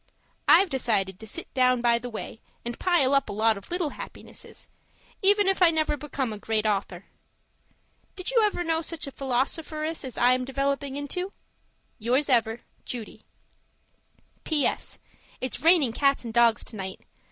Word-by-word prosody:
I've 385 -4 +6
decided 200 -8 0
to 220 - -9
sit - - -5
down 255 -1 +3
by 235 -1 +3
the 245 +1 -6
way 225 0 -7 0.2
and 240 0 -5
pile 335 -8 +3
up 275 - +2
a - - -4
lot 220 +2 +3
of 200 - -11
little 345 -4 -1
happinesses, - - -8 0.5
even 405 +1 +4
if 385 -1 +2
I 355 - +8
never 310 -2 +1
become 275 -5 -3
a 210 - -8
Great 220 0 -1
Author. 195 -3 -1 1.1
Did 370 +4 -4
you 480 -2 +4
ever 410 -4 +1
know 325 -1 +1
such 330 -1 -3
a 275 - -7
philosopheress 305 +5 -2
as 260 -2 -6
I 245 +1 +5
am 255 0 0
developing 275 +1 -2
into? 360 +7 -3 0.7
Yours 255 +6 +1
ever, 230 -2 +2 0.2
Judy 235 -4 -7 1.2
PS. 305 -3 0 0.4
It's 255 - -3
raining 320 -8 +5
cats 275 -1 +2
and 230 - -5
dogs 235 -2 +4
tonight. 190 -4 -7
265 Hz, 160 wpm, -26 LUFS, 230-315 Hz, 1.2 s, I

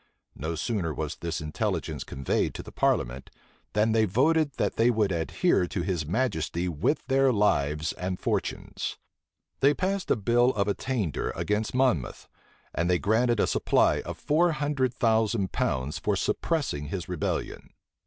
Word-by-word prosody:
No 80 +5 -3
sooner 90 - -2
was 75 -2 -3
this 85 -2 -3
intelligence 75 0 -2
conveyed 65 -1 -1
to - - -6
the - - -11
parliament, 60 +2 0 0.4
than 105 +1 +2
they 110 0 +4
voted 145 - +2
that - - -1
they 115 +2 +4
would 110 -4 +2
adhere 85 +1 +1
to 85 0 -3
his 85 -5 -2
majesty 90 -5 -1
with 85 - 0
their 135 0 +3
lives 75 - +1
and 90 0 -4
fortunes. - - -3 0.6
They 140 +2 +4
passed 195 +1 -1
a - - +4
bill 120 +4 +2
of 100 -1 +1
attainder 105 - -1
against 105 +3 -1
Monmouth; 125 - 0 0.5
and 85 +1 0
they 90 - +4
granted 115 +4 +2
a - - +4
supply - - +2
of - - -7
four 165 +3 +2
hundred 145 -4 0
thousand 110 -4 +1
pounds 65 +3 -1
for - - 0
suppressing 130 - -1
his 85 +1 -4
rebellion. - - -3
105 Hz, 155 wpm, -27 LUFS, 85-130 Hz, 0.6 s, they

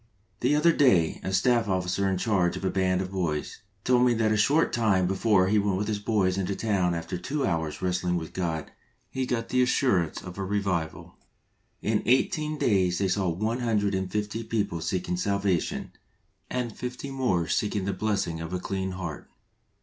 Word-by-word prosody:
Tl^e 140 +4 +3
other 165 +3 +5
day, 110 - +3
a 95 - -2
Staff 115 +4 +2
Officer 95 0 0
in 95 - 0
charge 90 -3 +1
of - - -5
a 95 - +1
band 95 -1 +1
of 95 0 -5
boys, 85 -6 -2 0.2
told 125 -1 +4
me 125 -1 +4
that 110 -1 +2
a - - +3
short 140 +10 +3
time 105 -6 +2
before 95 0 +3
he 105 +2 +3
went 100 -2 0
with 105 +1 -2
his 105 -2 -1
boys 100 -3 +1
into 95 +1 -1
a - - -5
town 95 -6 +1
that - - -1
after 85 +2 -5
two 140 +6 -2
hours' 80 -4 -2
wrestling 90 -1 0
with 80 -2 -6
God 80 -4 -3 0.4
he 130 -1 -2
got 115 -2 -2
the 125 - +2
assurance 125 - +2
of 90 +1 -8
a - - -1
revival. 85 -4 -2 0.7
In 110 0 +1
eighteen 150 +5 +2
days 95 -8 +2
they 95 0 0
saw 95 -1 +1
one 110 +8 -1
hundred 105 -4 +1
and 95 -1 -2
fifty 105 +2 -2
people 100 -7 -2
seeking 90 +1 -2
salvation, 100 -1 -1 0.6
and 120 -3 -3
fifty 125 +3 -5
more 110 -12 0
seeking 100 +3 0
the 100 - -1
blessing 95 -5 -1
of 80 +2 -6
a 90 - -1
clean 95 0 -3
heart. 90 -5 -6
100 Hz, 195 wpm, -27 LUFS, 90-115 Hz, 0.7 s, other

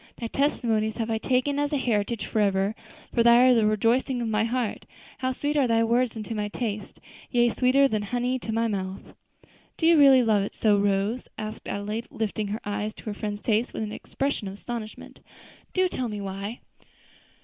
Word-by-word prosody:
'Thy 235 - -6
testimonies 225 -4 0
have 225 -1 -2
I 220 - 0
taken 265 +4 +1
as 290 0 0
a 290 - +1
heritage 225 -3 -1
forever, 200 -1 +1 0.4
for 235 - +3
they 235 0 +7
are 255 - +7
the 225 -3 +3
rejoicing 235 +5 +1
of 235 - -2
my 215 0 +1
heart,' 235 -1 -2 0.3
'How 260 0 0
sweet 290 +3 -2
are 280 -4 +3
thy 230 -1 +3
words 235 +1 +1
unto 220 +1 -5
my 210 -1 -2
taste! 210 -1 -5 0.3
Yea, 240 -1 +3
sweeter 265 +3 +4
than 215 -5 -1
honey 245 +4 -1
to 225 - -5
my 230 +1 +1
mouth.'" 190 -3 -5 0.6
"Do 320 - -1
you 330 -1 +6
really 270 -3 +7
love 215 -3 +3
it 200 - -4
so, 215 -2 +3
Rose?" 200 +4 0
asked 215 0 -6
Adelaide, 210 +3 -3
lifting 215 -1 -3
her 210 +2 -3
eyes 210 +1 -3
to - - -13
her 215 - -3
friend's 205 0 -5
face 225 +2 +1
with - - -3
an 210 - -4
expression 275 -2 -3
of 190 - -6
astonishment; 220 0 -7 0.5
"do 370 0 +2
tell 255 -8 -3
me 210 -2 -5
why?" 200 +3 -5
225 Hz, 195 wpm, -26 LUFS, 210-250 Hz, 0.6 s, they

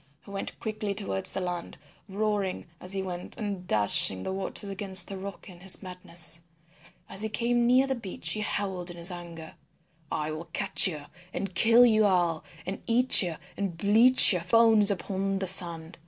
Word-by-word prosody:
He 200 - -13
went 195 0 -7
quickly 215 -2 -5
towards 95 - -1
the - - -1
land, 180 -1 -6 0.3
roaring 205 -1 -3
as 180 - -6
he 195 -1 -2
went 180 -1 -7
and 200 -4 -6
dashing 100 -2 +5
the - - -4
waters 195 +1 -4
against 195 -2 0
the 195 - -8
rocks 195 +1 -9
in 180 -3 -14
his 190 +2 +2
madness. 175 -2 -3 0.7
As 195 +1 -5
he 220 - -2
came 240 +2 -1
near 255 +2 +3
the 270 - -2
beach 225 -7 -5
he 215 - -2
howled 190 -4 -3
in 175 - -10
his 170 +2 +3
anger, 170 -2 -10 0.6
"I 150 0 -3
will 155 +2 -7
catch 195 +4 +2
you 150 -5 -6 0.3
and 195 -2 -5
kill 230 +6 +5
you 220 -2 +3
all 175 -4 0 0.2
and 190 +2 -6
eat 245 +2 +4
you 175 -4 -3 0.2
and 195 -4 -5
bleach 225 +6 +6
your 180 - -2
bones 220 0 +4
upon 195 0 -3
the 190 - -3
sand." 170 -3 +4
190 Hz, 185 wpm, -26 LUFS, 175-210 Hz, 0.7 s, bleach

